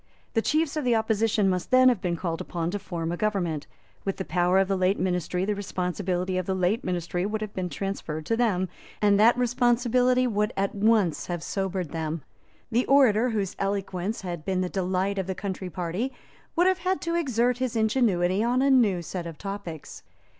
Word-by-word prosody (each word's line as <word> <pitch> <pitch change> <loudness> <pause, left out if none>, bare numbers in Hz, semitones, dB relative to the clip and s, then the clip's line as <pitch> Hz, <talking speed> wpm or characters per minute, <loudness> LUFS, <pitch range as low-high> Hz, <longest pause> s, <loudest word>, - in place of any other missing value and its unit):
The 225 - +2
chiefs 310 +4 +1
of 305 - -1
the 245 -2 +3
opposition 220 -2 +2
must 185 -2 -1
then 255 0 +6
have 240 -7 +3
been 175 -2 -1
called 170 -1 -3
upon 170 -1 -3
to 205 - -3
form 170 -4 -4
a 175 - -3
government. 175 -8 -1 0.4
With 195 - -2
the 190 - -4
power 180 +2 +2
of 195 0 +3
the 195 - +1
late 185 +1 +2
ministry 180 0 -1
the 210 - 0
responsibility 185 -1 -2
of 185 - -4
the 190 - 0
late 185 +6 +1
ministry 175 0 -2
would 215 +2 -2
have 215 -1 -5
been 185 -1 -3
transferred 165 -5 -4
to 230 - +1
them; 205 -6 +1 0.3
and 205 -1 +4
that 230 +3 +6
responsibility 250 +1 +2
would 210 -3 0
at 195 0 0
once 205 -5 +2
have 175 -2 -3
sobered 190 -5 -2
them. 160 -2 -3 0.5
The 240 +3 +1
orator 250 -4 +5
whose 205 -5 -2
eloquence 195 +1 -2
had 175 -5 -5
been 185 0 0
the 180 - -1
delight 190 +1 -1
of 190 - -3
the 190 - -2
Country 190 -1 -4
party 180 +8 -3 0.4
would 350 +1 +4
have 375 0 +3
had 370 +2 0
to 335 - -2
exert 250 -7 +1
his 255 -2 -1
ingenuity 215 -4 +2
on 250 +3 +2
a 275 - +4
new 210 -9 +3
set 175 0 -5
of 165 -2 -8
topics. 195 -6 -7
195 Hz, 200 wpm, -26 LUFS, 180-230 Hz, 0.5 s, then